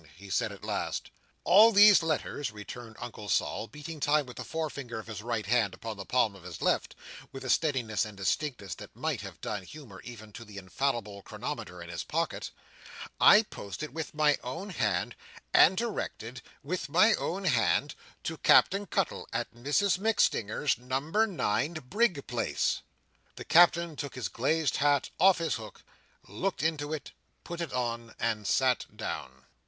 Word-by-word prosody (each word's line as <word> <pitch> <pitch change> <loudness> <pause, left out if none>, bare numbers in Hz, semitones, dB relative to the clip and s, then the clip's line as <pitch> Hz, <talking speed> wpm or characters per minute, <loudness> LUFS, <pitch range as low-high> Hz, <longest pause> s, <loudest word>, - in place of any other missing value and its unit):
he 100 0 -11
said - - +1
at - - -12
last. - - -3 0.3
"All 215 +5 +7
these 205 -2 +8
letters," 155 -3 -2
returned 110 +2 -9
Uncle 105 -3 -8
Sol, 110 - 0
beating 150 +3 -8
time 145 +1 +2
with 125 - -11
the - - -4
forefinger 145 -7 -4
of 110 - -7
his 110 -2 -7
right 115 -2 -2
hand 105 -3 +2
upon 115 -1 -6
the 100 -1 -8
palm 115 -5 +2
of 95 - -13
his 85 -2 -9
left, - - 0 0.4
with 135 0 -8
a 130 - +1
steadiness 125 -7 +1
and 105 -2 -8
distinctness 100 0 -2
that - - -11
might - - -2
have - - -9
done 105 -2 -4
honour, 115 -11 -11
even 110 -3 -11
to 115 - -8
the 105 -3 -12
infallible 105 +1 -2
chronometer - - -6
in - - -11
his - - -4
pocket, - - -2 0.7
"I 210 +2 +8
posted 150 - -7
with 160 -1 -5
my 150 -1 +3
own 170 +11 -5
hand, 105 - -1 0.4
and 185 - +7
directed 130 - -4 0.2
with 170 +2 -3
my 185 +9 +5
own 195 +3 -2
hand, 145 -2 +2 0.3
to 160 - -4
Captain 200 +1 +5
Cuttle, - - -1
at - - -3
Mrs 145 - +1
MacStinger's, 150 - +1
Number 140 - 0
nine 155 - -1
Brig 175 - 0
Place." 120 -2 -1 0.5
The - - -8
Captain 170 -1 +5
took 145 -1 -6
his 130 - -3
glazed 155 +4 0
hat 145 -1 +2
off 190 +2 +6
his 165 -5 -1
hook, 110 -3 -11 0.4
looked 170 - -3
into 155 -2 -1
it, 155 -3 -5 0.3
put 170 0 -6
it 170 - -4
on, 115 -2 -3
and 110 -3 -1
sat 130 -2 +2
down. 65 0 -6
135 Hz, 170 wpm, -29 LUFS, 110-165 Hz, 0.7 s, these